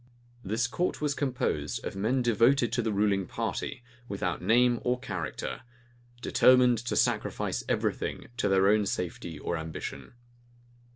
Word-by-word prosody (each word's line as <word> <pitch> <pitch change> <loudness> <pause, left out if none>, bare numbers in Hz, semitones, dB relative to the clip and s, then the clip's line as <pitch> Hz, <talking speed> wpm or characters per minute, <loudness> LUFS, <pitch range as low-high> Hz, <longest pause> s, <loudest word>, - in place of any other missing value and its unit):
This 110 +4 0
court 175 +9 -1
was 150 -1 0
composed 130 -3 -2
of - - -4
men 120 +6 +1
devoted 120 +1 +3
to 120 - +2
the 110 -1 -1
ruling 100 -2 +1
party, 130 +8 -4 0.3
without 95 -3 -2
name 120 +1 +4
or 125 0 0
character, 95 - -4 0.6
determined 125 -2 +5
to 120 +1 -3
sacrifice - - 0
every - - +1
thing - - -5
to 105 - +1
their 95 0 +4
own 105 0 +3
safety 85 -3 -4
or 85 - -3
ambition. 80 +7 -6
115 Hz, 140 wpm, -29 LUFS, 95-125 Hz, 0.6 s, determined